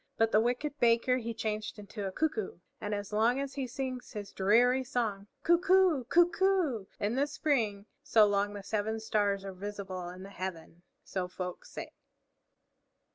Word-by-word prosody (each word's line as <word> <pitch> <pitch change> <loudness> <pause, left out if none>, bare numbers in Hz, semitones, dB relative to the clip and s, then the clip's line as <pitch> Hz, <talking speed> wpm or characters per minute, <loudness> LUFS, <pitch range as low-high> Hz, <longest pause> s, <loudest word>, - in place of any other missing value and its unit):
But 225 0 +3
the 215 - +5
wicked 275 +5 -1
Baker 235 +2 +4
he 235 -2 -3
changed 215 -1 -3
into 205 0 -6
a - - -4
Cuckoo; 225 -4 -1 0.2
and 210 -1 -2
as 205 0 -6
long 230 +5 +3
as 275 -1 -3
he 270 -2 -3
sings 255 0 -5
his 205 -2 -6
dreary 245 +7 +4
song, 225 -6 -2 0.2
"Coo 345 0 +5
coo! 370 -7 +4
Coo 345 +7 +5
coo!" 340 - +1
in 205 +2 0
the 275 +3 +1
spring, 235 -10 0 0.2
so 230 -7 +5
long 205 0 +1
the 200 - -7
Seven 220 +2 -1
Stars 205 -3 0
are 195 - -5
visible 190 -2 -5
in 185 +1 -9
the 195 - -10
heaven, 175 -3 -6 0.2
so 185 -2 -3
folk 180 0 -6
say. - - -8
220 Hz, 175 wpm, -31 LUFS, 200-260 Hz, 0.2 s, the